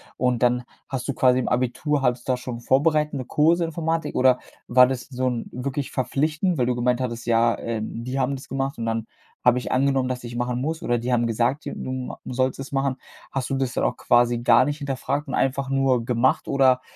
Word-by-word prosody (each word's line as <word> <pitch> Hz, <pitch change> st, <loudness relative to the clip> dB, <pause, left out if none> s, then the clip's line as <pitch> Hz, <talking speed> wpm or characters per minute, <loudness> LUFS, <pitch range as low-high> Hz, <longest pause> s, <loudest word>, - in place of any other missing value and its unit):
und 125 Hz, -1 st, 0 dB
dann 125 Hz, 0 st, +2 dB, 0.2 s
hast 130 Hz, -2 st, -4 dB
du -, -, +1 dB
quasi 125 Hz, 0 st, +3 dB
im 130 Hz, -, -1 dB
Abitur 130 Hz, +4 st, 0 dB
hattest 125 Hz, -1 st, 0 dB
du -, -, +5 dB
da -, -, -1 dB
schon 125 Hz, -1 st, -6 dB
vorbereitende 150 Hz, 0 st, +1 dB
Kurse 165 Hz, +6 st, +3 dB
Informatik? 165 Hz, -1 st, -2 dB
oder 125 Hz, -1 st, +4 dB, 0.3 s
war 125 Hz, +1 st, +7 dB
das 130 Hz, -1 st, -2 dB
so 130 Hz, -1 st, -1 dB
'n 120 Hz, -2 st, -4 dB
wirklich 140 Hz, +2 st, -4 dB
verpflichtend, 155 Hz, +6 st, 0 dB
weil 125 Hz, -, +2 dB
du 125 Hz, 0 st, 0 dB
gemeint 125 Hz, +1 st, +1 dB
hattest, 120 Hz, -2 st, -4 dB
ja, 115 Hz, 0 st, +3 dB
ähm: 115 Hz, 0 st, -4 dB
„Die 130 Hz, +2 st, -2 dB
haben 135 Hz, +2 st, 0 dB
das 135 Hz, -, -12 dB
gemacht, 135 Hz, 0 st, -2 dB
und 115 Hz, -, -3 dB
dann 115 Hz, -1 st, -1 dB, 0.4 s
habe 125 Hz, 0 st, +4 dB
ich -, -, -5 dB
angenommen, 135 Hz, 0 st, +2 dB
dass 125 Hz, -1 st, -4 dB
ich 120 Hz, 0 st, -7 dB
machen 120 Hz, 0 st, -1 dB
muss“, 160 Hz, +5 st, -2 dB
oder 120 Hz, -, +1 dB
die 120 Hz, +2 st, -2 dB
haben 120 Hz, -1 st, +2 dB
gesagt, 120 Hz, +6 st, 0 dB
d -, -, -4 dB
du 130 Hz, -, -5 dB
ma 130 Hz, -1 st, -5 dB
sollst 130 Hz, +1 st, -1 dB
es 135 Hz, -, -7 dB
machen. 135 Hz, -1 st, 0 dB, 0.4 s
Hast 135 Hz, -2 st, -3 dB
du -, -, +1 dB
das 135 Hz, -2 st, -1 dB
dann -, -, -1 dB
auch -, -, +1 dB
quasi 120 Hz, 0 st, +3 dB
gar 120 Hz, +1 st, +5 dB
nicht 145 Hz, +1 st, -3 dB
hinterfragt 140 Hz, +1 st, -2 dB
und 135 Hz, -, -3 dB
einfach 135 Hz, 0 st, 0 dB
nur 135 Hz, -3 st, +2 dB
gemacht, 120 Hz, +2 st, +1 dB
oder 130 Hz, -2 st, +3 dB
130 Hz, 225 wpm, -24 LUFS, 120-135 Hz, 0.4 s, war